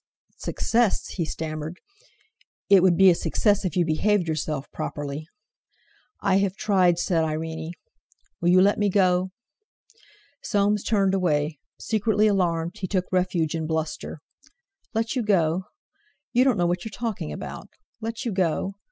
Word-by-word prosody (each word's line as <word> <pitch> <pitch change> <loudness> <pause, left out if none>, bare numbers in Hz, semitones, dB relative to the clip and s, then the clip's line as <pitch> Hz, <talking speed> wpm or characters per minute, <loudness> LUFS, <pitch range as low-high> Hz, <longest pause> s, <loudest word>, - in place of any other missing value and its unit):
"Success," 230 -3 0
he 175 - -2
stammered—"it 180 - -3
would 180 -2 +4
be 190 0 +7
a - - +5
success 205 +4 +1
if 185 - -2
you 175 - +3
behaved 180 +4 +1
yourself 155 -3 -2
properly!" 145 +1 -5 0.9
"I 195 -1 +3
have 195 -1 0
tried," 185 -5 +3
said 170 -2 +1
Irene. 160 +1 -3 0.7
"Will 175 - +2
you 185 +1 +6
let 205 +1 +3
me 205 -1 +2
go?" 185 -1 +2 1.1
Soames 205 0 +1
turned 195 -3 +2
away. 155 -5 0 0.2
Secretly 215 -1 +1
alarmed, 180 -2 0
he 185 - -3
took 185 -1 0
refuge 180 -4 +1
in 160 -1 -2
bluster. 160 -1 -3 0.7
"Let 225 +3 0
you 255 - +1
go? 185 -4 +1 0.7
You 250 +2 +4
don't 255 -5 +3
know 175 - +2
what 175 0 0
you're 220 - -5
talking 220 - -4
about. 75 - -7 0.3
Let 225 +3 -4
you 235 - -1
go? 185 0 0
185 Hz, 145 wpm, -25 LUFS, 160-205 Hz, 1.1 s, be